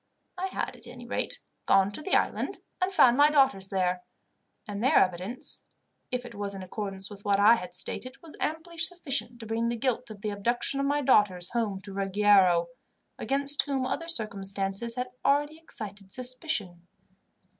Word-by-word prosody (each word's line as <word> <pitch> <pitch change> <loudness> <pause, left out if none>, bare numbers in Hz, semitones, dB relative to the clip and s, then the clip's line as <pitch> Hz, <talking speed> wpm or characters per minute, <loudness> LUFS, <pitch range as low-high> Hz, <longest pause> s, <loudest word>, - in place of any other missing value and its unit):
I 370 +1 -2
had, - - -4
at - - -15
any - - -10
rate, - - -2 0.3
gone 195 0 +4
to 205 - -7
the 375 - +1
island - - 0 0.2
and 365 +1 +1
found 265 -9 +5
my 290 +1 +7
daughters 270 -10 +3
there; 180 -1 0 0.7
and 205 +1 -4
their 260 - +5
evidence, 185 +6 0 0.5
if 250 0 -3
it 240 - -9
was 200 -1 -4
in 190 - -6
accordance 195 +1 -4
with 200 0 -10
what 200 -1 +2
I 210 +3 +8
had 180 -6 -3
stated, 255 +7 -1
was 325 -2 -10
amply 325 +2 -3
sufficient 290 -8 0
to 225 - -8
bring 225 +1 -1
the 235 - -1
guilt 250 0 -1
of 210 -2 -10
the 210 -1 -2
abduction 240 +6 -1
of 275 - +1
my 290 +1 +1
daughters 205 -9 +3
home 215 -5 -1
to 195 0 -9
Ruggiero, 195 -2 +4 0.5
against 280 +1 +2
whom 270 -2 0
other 330 +5 -3
circumstances 200 - -1
had 250 0 -3
already 290 +3 +2
excited 205 -10 -7
suspicion. 250 - -3
225 Hz, 175 wpm, -28 LUFS, 195-275 Hz, 0.7 s, I